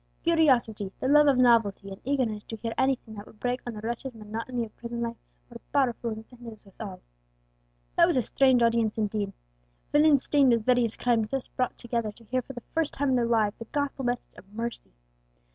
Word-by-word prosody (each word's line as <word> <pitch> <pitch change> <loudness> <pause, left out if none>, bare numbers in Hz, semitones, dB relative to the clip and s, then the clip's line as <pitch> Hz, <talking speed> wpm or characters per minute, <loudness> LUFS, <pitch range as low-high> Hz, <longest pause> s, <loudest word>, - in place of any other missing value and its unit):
Curiosity, 255 - +2
the - - -1
love 295 +2 +6
of 275 -3 +4
novelty, 225 -5 +3
and 195 - -9
eagerness 245 -6 -1
to 225 - -6
hear 225 +1 -4
anything 260 -4 0
that 205 -1 -9
would 210 - -17
break 250 +1 -1
on 235 - -4
the 210 - -7
wretched 235 +3 -4
monotony 230 +3 -4
of 215 - -16
prison 235 0 -6
life, 235 0 -2 0.3
were 235 - -10
powerful 245 -4 +1
incentives 225 0 -10
with 195 - -18
all. 195 -4 -7 1.0
That - - +7
was - - +1
a 250 - +2
strange 260 +1 +3
audience 230 -2 +2
indeed! 210 -2 -1 0.6
Villains 295 -2 +5
stained 275 -4 +4
with 230 -2 0
various 245 -3 +2
crimes 230 -3 +1
thus 270 -1 -3
brought 255 -1 -2
together 235 -2 -2
to 230 - -18
hear 255 +3 -1
for 270 - -10
the 240 - -9
first 325 -2 0
time 285 0 0
in 260 - +3
their 240 -2 +2
lives 220 -3 +2
the 230 - -6
gospel 285 +1 -2
message 245 -1 -2
of 195 - -15
mercy. 230 - -5
235 Hz, 205 wpm, -27 LUFS, 220-260 Hz, 1.0 s, That